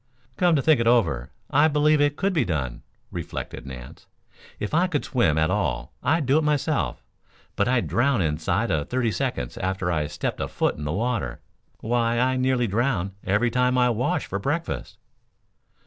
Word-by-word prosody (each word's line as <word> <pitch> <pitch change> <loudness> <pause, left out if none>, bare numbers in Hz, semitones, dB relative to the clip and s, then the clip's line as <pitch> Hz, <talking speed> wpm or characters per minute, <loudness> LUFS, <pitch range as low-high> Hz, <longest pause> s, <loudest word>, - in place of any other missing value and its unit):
"Come 175 +2 +3
to 140 - +1
think 155 -5 +4
it 115 - +1
over, 85 - +2 0.2
I 145 +3 +5
believe 150 0 +3
it 145 0 +2
could 195 0 0
be 155 -7 +2
done," 70 - -3 0.3
reflected - - -6
Nance. 65 -2 -10 0.5
"If 105 - -4
I 175 +4 +3
could 150 -6 -2
swim 85 - +2
at 80 +2 +2
all 70 -12 -1
I'd 150 +4 +1
do 135 +4 +4
it - - -1
myself, 145 - 0 0.5
but - - +1
I'd 125 -1 +2
drown 125 0 +2
inside 80 -2 0
of 75 -2 -1
thirty 125 -3 0
seconds 60 -9 -3
after 95 -1 -1
I 75 -3 0
stepped - - -3
a - - -1
foot - - 0
in 75 - -6
the 75 - -1
water. 105 - -2 0.4
Why, 115 0 +1
I 130 +1 +2
nearly 130 -1 +1
drown 105 -3 0
every 105 +5 +1
time 125 +1 +2
I 125 -1 +4
wash 120 +2 0
for 100 - -4
breakfast." 145 +10 -3
120 Hz, 180 wpm, -24 LUFS, 85-140 Hz, 0.5 s, I